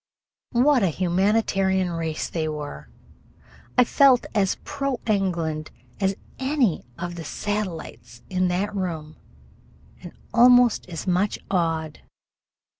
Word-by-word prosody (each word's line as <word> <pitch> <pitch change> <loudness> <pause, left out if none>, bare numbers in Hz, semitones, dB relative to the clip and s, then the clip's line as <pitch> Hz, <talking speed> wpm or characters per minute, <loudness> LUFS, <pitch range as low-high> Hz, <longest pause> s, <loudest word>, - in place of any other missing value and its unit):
What 255 +2 +4
a 195 - +3
humanitarian 190 +1 +1
race 165 -2 -3
they 160 -2 -2
were! 145 - -6 0.9
I - - +8
felt 260 0 +4
as 200 -4 +1
pro 275 -3 -3
England 170 -7 -1 0.3
as 195 -1 +1 0.2
any 265 - +1
of 175 0 -4
the 170 -1 -7
satellites 165 - -5
in 185 -1 0
that 190 +4 -1
room, 160 -5 -4 0.8
and - - -9 0.2
almost 245 -3 +5
as 165 -2 -6
much 185 +2 +1
awed. 165 -4 -1
185 Hz, 115 wpm, -24 LUFS, 165-215 Hz, 0.9 s, I